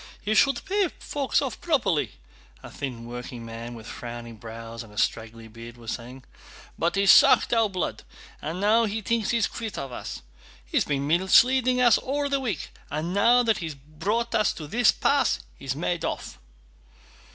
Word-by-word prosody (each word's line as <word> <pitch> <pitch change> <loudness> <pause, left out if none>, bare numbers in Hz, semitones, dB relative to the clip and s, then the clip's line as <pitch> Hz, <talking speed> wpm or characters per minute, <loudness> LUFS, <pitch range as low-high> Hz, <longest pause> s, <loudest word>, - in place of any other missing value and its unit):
"He 210 - -1
should 275 - +3
pay 395 0 +1
folks 285 0 -1
off 265 - -5
properly," 230 - +1 0.5
a - - -10
thin 125 -5 -6
workingman, 120 -1 -7
with 110 -2 -11
frowning 120 -1 -8
brows 115 +1 -8
and 115 -3 -12
a 105 - -16
straggly 115 0 -2
beard, 115 +1 -11
was 115 -2 -6
saying. 125 +2 -7 0.5
"But 170 +3 0
he's 195 0 +6
sucked - - +6
our 225 -2 +3
blood 185 -3 -3 0.4
and 160 +4 -4
now 220 +3 +4
he 220 +1 -3
thinks 230 +1 0
he's 235 -3 +2
quit 225 -2 -5
of 135 - -5
us. 120 - -7 0.4
He's - - 0
been 140 -1 -1
misleading 245 - +4
us 240 -3 +6
all 285 +2 -2
the 275 0 +1
week 220 - -3 0.2
and 155 +4 -3
now 235 +5 +5
that 225 -2 +2
he's 160 -4 -5
brought 190 - -3
us 215 - +2
to 155 - -8
this 235 +9 +4
pass 280 -3 +2 0.2
he's 135 -1 -4
made 175 +3 -2
off." - - -4
175 Hz, 175 wpm, -26 LUFS, -, 0.5 s, he's